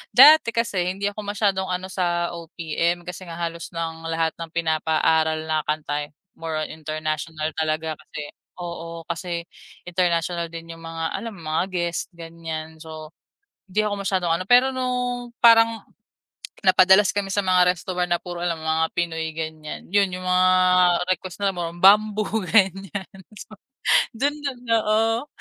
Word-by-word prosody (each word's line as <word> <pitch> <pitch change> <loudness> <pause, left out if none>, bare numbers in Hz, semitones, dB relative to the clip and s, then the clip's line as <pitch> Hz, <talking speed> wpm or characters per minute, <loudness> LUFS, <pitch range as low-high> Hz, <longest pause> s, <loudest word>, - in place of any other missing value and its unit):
dati 285 0 +8
kasi 190 -6 0
hindi 200 +1 -1
ako 205 - -10
masyadong 200 -2 0
ano 180 +1 -3
sa 175 -2 0
OPM 170 +1 -2
kasi 180 +1 -8
nga 165 - -7
halos 170 0 -4
ng 165 0 -4
lahat 165 0 0
ng 165 - -5
pinapaaral 160 -1 +1
na 155 -1 0
kanta, 150 -1 -2
eh, - - -28 0.3
more 160 -1 -2
on - - -6
international 155 0 -3
talaga 155 0 -2
kasi 145 -1 -8 0.3
oo. 170 -1 -7
Kasi 170 0 -4 0.4
international 175 -1 0
din 165 0 -8
'yung 165 - -14
mga, 165 -1 -4
alam 230 +3 -5
mo, 160 -3 -7
mga 160 - +2
guest, 175 -2 -2
ganiyan 165 -1 -7
so, 155 -1 -9 0.6
hindi 205 +3 +1
ako 210 - -1
masyadong 185 -3 0
ano. 185 - -4
Pero 250 +2 +6
nung 250 -1 -2
parang 230 -1 +5 0.8
napadalas 190 +1 +6
kami 200 -1 -2
sa 200 +1 0
mga 180 -1 +4
resto 180 +1 -1
bar 180 0 -1
na 175 - +2
puro 175 0 -7
lang 175 -1 -1
mga 160 0 +2
Pinoy, 160 -2 -1
ganiyan, 155 -1 -6
'yun 200 -1 +4
'yung 185 0 -6
mga 185 0 +3 0.6
request 185 -1 -5
na 195 - +2
more 175 -2 -3
on 170 +1 -11
Bamboo, 215 +2 +4
ganiyan. 195 -1 0 0.2
So, 215 +1 -11 0.6
dun 285 +4 +1
dun 275 -4 -4
oo. 225 +3 +2
175 Hz, 160 wpm, -23 LUFS, 160-195 Hz, 0.8 s, dati